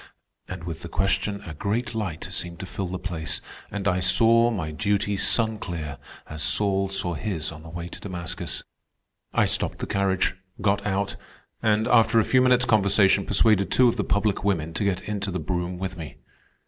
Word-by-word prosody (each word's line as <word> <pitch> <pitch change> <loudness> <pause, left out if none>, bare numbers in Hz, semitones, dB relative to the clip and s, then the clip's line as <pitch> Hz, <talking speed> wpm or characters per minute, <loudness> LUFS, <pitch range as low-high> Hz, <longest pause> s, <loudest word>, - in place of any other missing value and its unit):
And 95 -2 -7
with 85 -1 -6
the 85 - -7
question 100 +3 0
a 80 - -6
great 110 +10 -2
light 100 -8 -3
seemed 85 0 -3
to - - -5
fill 95 +1 -4
the 90 +1 -4
place, 85 -4 -3 0.3
and 100 -1 -3
I 90 -2 +2
saw 115 +5 +4
my 90 -9 -3
duty 100 +5 0
sun 110 +2 +1
clear, 80 -7 -5 0.3
as 80 0 -5
Saul 95 +2 +1
saw 90 -3 -1
his 85 -3 -3
on 80 -1 -10
the 80 - -11
way 85 +1 -6
to - - -9
Damascus. 90 -3 -5 0.7
"I - - +3
stopped - - 0
the - - -4
carriage, 95 -2 +1 0.3
got 100 0 +1
out, 100 0 -1 0.4
and, 110 0 +2
after 115 -1 +5
a - - +4
few 130 - +4
minutes' 125 0 +4
conversation, 100 -3 +4
persuaded 100 -1 +3
two 125 - +5
of 120 - -2
the 105 - +1
public 100 -1 0
women 85 -5 0
to 105 - -1
get 95 -2 0
into 105 -2 -3
the 90 - -2
brougham 90 +2 -2
with 95 0 -4
me. 75 -7 -8
95 Hz, 190 wpm, -25 LUFS, 85-105 Hz, 0.7 s, after